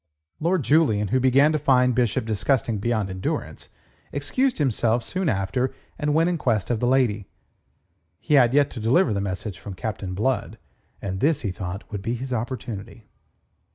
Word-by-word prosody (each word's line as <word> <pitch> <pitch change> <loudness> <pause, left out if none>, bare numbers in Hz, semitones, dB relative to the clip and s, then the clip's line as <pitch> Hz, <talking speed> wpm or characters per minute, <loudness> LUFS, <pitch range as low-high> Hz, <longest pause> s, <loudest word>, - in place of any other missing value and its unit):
Lord 170 0 +1
Julian, 115 -10 +3
who 130 - +2
began 135 +4 +4
to 155 - 0
find 125 -3 +3
Bishop 120 -2 +1
disgusting 110 +1 0
beyond 110 -2 -1
endurance, 95 0 -4 0.4
excused 240 - 0
himself 120 -4 +1
soon 185 -3 -1
after, 100 +6 0 0.3
and 150 0 0
went 165 +1 +4
in 175 -2 -1
quest 115 -5 0
of 115 - 0
the 120 - +1
lady. 120 -6 +2 0.9
He 155 - -2
had 125 -5 +6
yet 145 +1 +3
to 120 - -7
deliver 115 - +3
the 100 - -1
message 100 0 -4
from 100 - -8
Captain 95 -2 -4
Blood, 130 +6 -1 0.5
and 95 -1 -3
this, 150 +4 +2
he 100 - -2
thought, 95 +1 -6
would 100 -2 -4
be 115 +4 -2
his 130 +2 -5
opportunity. 115 -2 -5
120 Hz, 170 wpm, -24 LUFS, 105-140 Hz, 0.9 s, had